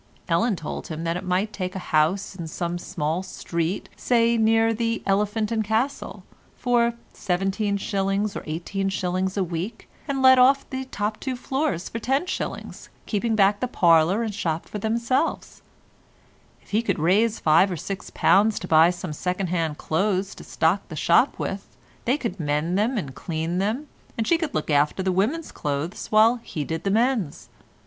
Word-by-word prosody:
Ellen 205 +6 +2
told 160 -3 -6
him 160 0 -5
that 165 0 -1
he 180 - -3
might 190 +3 -1
take 185 -1 -4
a 190 - -7
house 170 +7 +2
in 170 -3 -6
some 175 +2 -3
small 160 +1 -2
street, 170 -1 -3
say 235 -1 +2
near 225 0 +3
the 230 0 -1
"Elephant 210 +2 0
and 220 -1 +1
Castle," 225 +6 -2 0.3
for 235 -1 +2 0.2
17s. 195 +1 -1
or - - -4
18s. 185 +3 -2
a 195 - +2
week, 180 +6 -5 0.2
and 270 -2 -1
let 260 0 +8
off 270 +2 +5
the 260 0 -3
two - - -24
top 210 -2 -3
floors 260 - -2
for 230 - -5
10s., 270 +10 -3 0.2
keeping 225 +2 -1
the - - +2
back 205 +4 +2
parlour 170 +5 +4
and 220 -2 -3
shop 165 -5 -2
for 210 - -5
themselves. 235 +8 -1 1.0
If - - -22
he 215 +2 +2
could 200 -5 -1
raise 205 +8 +2
five 165 +5 +4
or 175 - -3
six 195 +5 -6
pounds 210 +2 +3
to 180 - -5
buy 160 +1 +6
some 175 -2 -4
second 180 +3 -2
hand 165 -4 -1
clothes 190 +3 0
to - - -12
stock 170 +5 +1
the 160 - -8
shop 170 - +3
with, 195 +1 -5 0.3
they 255 +4 +2
could 215 -9 -4
mend 150 +3 0
them 225 +6 +1
and 140 -10 -4
clean 165 +4 -3
them, 220 +9 -1 0.3
and 225 - 0
she 335 +5 +3
could 320 -4 -3
look 155 - -1
after 150 +6 +2
the 190 - +1
women's 235 - 0
clothes 145 +5 -3
while 220 +3 +5
he 165 -9 -5
did 160 +4 -4
the - - +2
men's. 225 - 0
195 Hz, 175 wpm, -24 LUFS, 170-230 Hz, 1.0 s, let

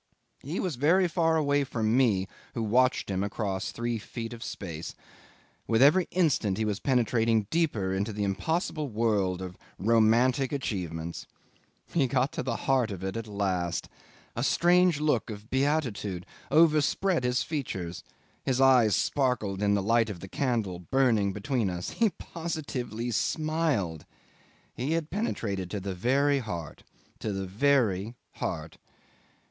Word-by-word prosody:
He 155 +7 -4
was 180 -9 -2
very 175 +7 +4
far 165 -1 +2
away 145 -2 +2
from 115 -4 0
me 105 -8 +3 0.3
who 115 - -1
watched 125 +4 +2
him 95 0 0
across 100 -1 -2
three 120 -1 -2
feet 115 +2 -6
of 115 - -8
space. 85 -5 -6 0.7
With 115 -1 +2
every 165 +6 +5
instant 140 - +1
he 110 - 0
was 105 -2 -1
penetrating 115 -4 +2
deeper 130 - +1
into 100 +3 -1
the 105 0 -3
impossible 155 - -1
world 105 -5 0
of 90 -1 -8 0.2
romantic 115 +5 +3
achievements. 85 - -4 0.7
He 145 -6 +3
got 130 +2 +1
to - - -3
the 125 -2 -2
heart 130 -4 +2
of 95 -3 -6
it 95 +1 -3
at 115 -1 -4
last! 95 -4 -2 0.5
A 120 - -2
strange 175 +1 +4
look 150 -7 +1
of 105 +1 -9
beatitude 130 - 0 0.2
overspread 160 +2 +3
his 125 +1 +1
features, 95 - -4 0.4
his 130 -1 0
eyes 125 -7 +5
sparkled 120 -8 0
in 100 0 +3
the 100 - 0
light 115 +2 +3
of 100 -4 -6
the 95 - -8
candle 110 -7 -1
burning 110 0 +2
between 105 +1 -1
us; 90 -1 -4
he 230 -2 +2
positively 135 - -4
smiled! 150 - -1 0.7
He 135 +6 -2
had 165 -2 -2
penetrated 100 - -2
to 105 - -3
the 95 0 -4
very 140 +9 +2
heart 85 - -6 0.4
to 110 - -3
the 95 -1 -3
very 110 -1 +1 0.2
heart. - - -4
115 Hz, 145 wpm, -28 LUFS, 100-140 Hz, 0.7 s, every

